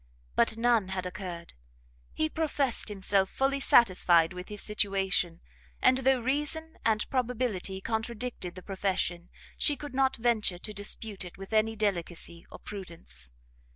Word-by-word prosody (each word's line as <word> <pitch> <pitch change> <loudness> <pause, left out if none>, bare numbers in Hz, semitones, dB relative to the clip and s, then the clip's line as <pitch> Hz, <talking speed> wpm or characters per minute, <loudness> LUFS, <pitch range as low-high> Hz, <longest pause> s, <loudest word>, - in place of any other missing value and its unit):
But 220 - +2
none 230 -4 +3
had 190 -1 -3
occurred; 180 -2 -6 0.6
he 315 - 0
professed 290 -7 0
himself 195 -1 +1
fully 275 +1 +1
satisfied 185 -10 +5
with 180 0 -8
his 210 0 -4
situation; 195 -5 +1 0.4
and 255 - +4
though 265 0 +3
reason 295 +5 -1
and 215 -2 +2
probability 240 -7 -1
contradicted 225 -4 -3
the 185 - -9
profession, 185 -3 -1 0.3
she 295 - +3
could 290 0 -8
not 265 0 +2
venture 225 -6 +1
to 210 +4 -6
dispute 205 0 -4
it 180 - -10
with 195 +3 -9
any 220 +1 +3
delicacy 175 -5 -2
or - - -8
prudence. 165 - -9
210 Hz, 140 wpm, -29 LUFS, 185-245 Hz, 0.6 s, satisfied